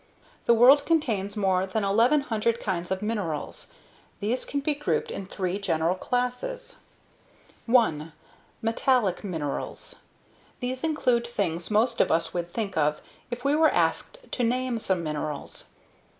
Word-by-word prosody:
The 235 - +6
world 265 +5 +7
contains 225 - 0
more 190 -2 +2
than 210 +3 -1
1,100 230 +1 +2
kinds 180 -4 -3
of 190 +2 -2
minerals. 200 -9 -3 0.5
These 225 +5 -1
can 280 - -2
be 295 +2 +1
grouped 290 +1 -1
in 195 - -6
three 190 0 -2
general 165 -3 +1
classes. 250 - -3 0.9
1. 165 -11 +3 0.5
METALLIC 225 -4 +1
MINERALS. 160 -8 -4 0.6
These 255 0 -3
include 250 -7 +1
things 175 -7 -2
most 230 +3 +2
of - - +2
us 165 0 +1
would 175 -1 -3
think 205 0 -3
of 150 -1 +1 0.3
if 245 +1 -6
we 285 +1 +3
were 315 0 +5
asked - - 0
to 250 - -1
name 250 0 0
some 190 -5 0
minerals. 150 -2 -4
215 Hz, 135 wpm, -26 LUFS, 180-250 Hz, 0.9 s, world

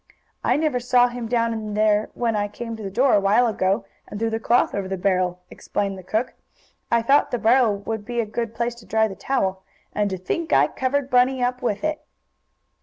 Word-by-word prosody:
"I - - +2
never 300 -5 0
saw 245 0 +3
him 240 -1 -5
down 230 0 +1
in 215 -2 -5
there 215 0 +2
when 235 -2 0
I 205 0 0
came 230 +2 -6
to 220 - -10
the 200 - -4
door 250 +6 +2
a 205 - +5
while 205 +5 +3
ago, 195 -3 0 0.2
and 205 - -7
threw 225 0 0
the 225 - -1
cloth 235 +2 +2
over 200 -2 -2
the 190 0 -3
barrel," 180 -1 0
explained 200 -1 -3
the 190 - -9
cook. 220 +7 -2 0.6
"I 235 -1 +2
thought 275 +5 +4
the 245 - -1
barrel 230 -2 +3
would 215 +1 -5
be 240 +2 -4
a 230 - +1
good 230 +1 -4
place 235 +1 -1
to 230 - -15
dry 220 0 +2
the 195 - -8
towel. 190 -6 -1 0.3
And 205 -1 0
to 190 - -3
think 320 - -3
I - - +5
covered 270 +1 -1
Bunny 250 +1 +3
up 250 +1 -1
with 215 -2 -2
it!" 310 0 -1
225 Hz, 225 wpm, -23 LUFS, 205-245 Hz, 0.6 s, a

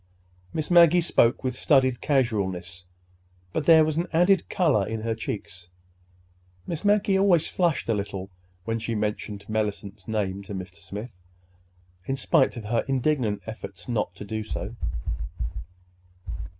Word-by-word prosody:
Miss 155 +2 -3
Maggie 170 0 +7
spoke 135 -7 +3
with 130 -1 0
studied 130 -2 +3
casualness, 100 - -1 0.7
but 150 - -2
there 160 -2 +8
was 155 0 -1
an 170 +2 0
added 180 +2 +3
color 150 - +3
in 110 0 -3
her 115 0 -1
cheeks—Miss 90 - -9
Maggie 205 -1 +3
always 180 -5 +4
flushed 170 -5 0
a 115 - +2
little 100 -2 -4 0.3
when 115 0 -1
she 115 +1 -3
mentioned 105 -1 -3
Mellicent's 105 -2 -3
name 100 -3 -1
to 100 - -6
Mr. 95 0 -7
Smith, 100 +3 -8 0.9
in 135 - 0
spite 135 -3 +2
of 115 - -6
her 115 +2 +1
indignant 130 -5 0
efforts 100 -5 -8
not 115 -4 -1
to 105 - -8
do 110 +1 -3
so. 105 +1 -5
110 Hz, 135 wpm, -26 LUFS, 100-150 Hz, 0.9 s, there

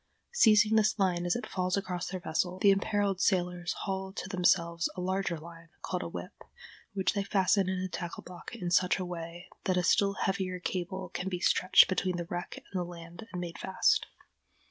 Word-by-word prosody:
Seizing 220 - +5
this 215 0 +3
line 180 -3 +1
as 175 - +2
it 245 - -3
falls 185 0 -1
across 180 -3 -3
their 185 - -4
vessel, 180 +2 -1
the 200 +1 +5
imperiled 200 -1 +1
sailors 180 -1 +1
haul 190 -1 -3
to - - -5
themselves 170 -3 +2
a - - -6
larger 185 -1 -1
line, 165 +1 -12
called - - -2
a - - -4
"whip," - - -8 0.5
which 190 -1 +1
they 200 - 0
fasten 195 -1 +2
in 190 - -1
a 185 +1 -2
tackle 175 -1 -6
block 180 -1 -10
in 175 -1 -4
such 180 +1 +3
a 185 - -3
way 175 0 -7 0.2
that 185 -1 +1
a 180 - +2
still 200 +2 +3
heavier 185 -1 -1
cable 180 +1 -4
can 190 - -4
be 180 -2 -3
stretched 185 0 +5
between 185 -1 0
the 175 - -3
wreck 175 +1 -5 0.2
and 190 - -2
the - - 0
land 170 +2 -10
and 180 - -4
made 175 -1 -6
fast. 190 - +2
185 Hz, 200 wpm, -30 LUFS, 175-195 Hz, 0.5 s, Seizing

